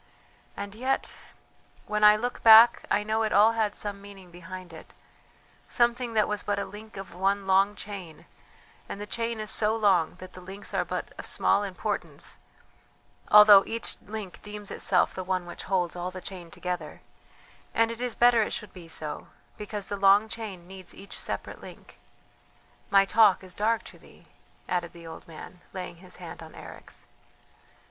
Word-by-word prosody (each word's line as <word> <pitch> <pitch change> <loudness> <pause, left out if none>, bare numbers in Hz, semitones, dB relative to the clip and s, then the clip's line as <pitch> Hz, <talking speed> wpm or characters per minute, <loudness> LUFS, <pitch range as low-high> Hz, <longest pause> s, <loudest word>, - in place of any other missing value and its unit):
and 200 0 -6
yet? 255 +5 -2 0.7
"When 210 0 -1
I 210 0 +9
look 245 +3 -3
back 225 +1 +8
I 210 - +2
know 220 +1 0
it 215 -1 0
all 215 +2 +6
had 220 -2 -1
some 200 -1 -4
meaning 195 -3 -12
behind 180 0 -10
it 160 - -13 0.7
something 240 -1 +1
that 215 - +3
was 210 -1 -2
but 205 0 -2
a 200 - -2
link 215 0 -11
of 195 0 -8
one 195 +2 0
long 195 +2 +3
chain, 190 -7 -9 0.6
and - - -6
the 205 - -5
chain 230 +1 -3
is 215 -1 -3
so 215 0 +2
long 190 -8 +2
that 185 +1 -12
the 185 - -11
links 195 +2 -9
are - - +1
but - - -5
of - - -4
small 200 - +2
importance, 190 -5 -5 0.9
although 210 -2 +9
each 230 0 -4
link 210 -2 -7
deems 210 -1 -7
itself 180 - +2
the 185 - -5
one 185 -1 -2
which 175 - -8
holds 180 -3 0
all 175 +1 -3
the 185 0 -8
chain 180 -2 -8
together; 175 -3 -5 0.7
and 230 0 +2
it 230 +1 -7
is 245 -2 -1
better 240 -1 +5
it 215 - -1
should 210 -3 -6
be 175 -3 -11
so, 155 -2 -6 0.3
because 210 -1 -5
the 200 - -4
long 200 +2 +5
chain 210 -6 -7
needs 190 -1 -10
each 200 - -8
separate - - -4
link. - - -13 0.9
My 195 -1 +5
talk 205 -2 +4
is 185 -1 -9
dark 220 +3 0
to - - -13
thee," - - -19 0.4
added 175 -2 -2
the 170 -1 -12
old 160 - -10
man, 175 +2 -11
laying 180 -2 -6
his 180 +1 -9
hand 175 -2 -9
on 160 -1 -12
Eric's. - - -10
200 Hz, 180 wpm, -27 LUFS, 180-215 Hz, 0.9 s, I